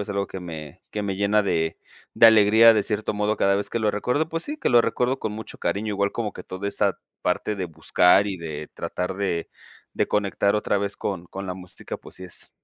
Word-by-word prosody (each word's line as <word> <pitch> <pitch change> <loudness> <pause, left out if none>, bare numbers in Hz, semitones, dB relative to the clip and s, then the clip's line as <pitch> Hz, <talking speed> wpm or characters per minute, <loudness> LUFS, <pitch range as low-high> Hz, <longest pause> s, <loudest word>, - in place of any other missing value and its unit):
es 105 - -5
algo 100 -1 -1
que 95 - -7
me 80 -4 -8
que 105 - -3
me 100 -2 -2
llena 100 +2 +3
de 80 -5 -1 0.4
de 115 - +8
alegría, 110 +1 +7
de 105 - +2
cierto 105 +1 -1
modo, 105 +1 0
cada 100 0 +3
vez 100 - -2
que - - -1
lo 110 -2 +2
recuerdo, 125 +9 0
pues 165 0 -3
sí, 300 +1 -4
que - - 0
lo 120 -1 +7
recuerdo 125 +3 0
con 110 - -3
mucho 110 +1 -8
cariño, 100 +5 -1
igual 100 0 0
como 110 -4 -3
que - - -9
toda 95 +2 -5
esta - - 0 0.2
parte 105 - -1
de 95 - -3
buscar 90 +4 +3
y 100 -2 -3
de 80 -2 -6
tratar 90 +1 -3
de 95 -4 -2 0.5
de - - 0
conectar 100 0 +1
otra 105 -1 0
vez 100 0 -3
con 95 -4 -4
con 95 +3 -7
la 90 - -3
música, 90 -1 -8
pues - - -12
sí 95 - -9
es, 90 - -8
100 Hz, 235 wpm, -24 LUFS, 95-110 Hz, 0.5 s, de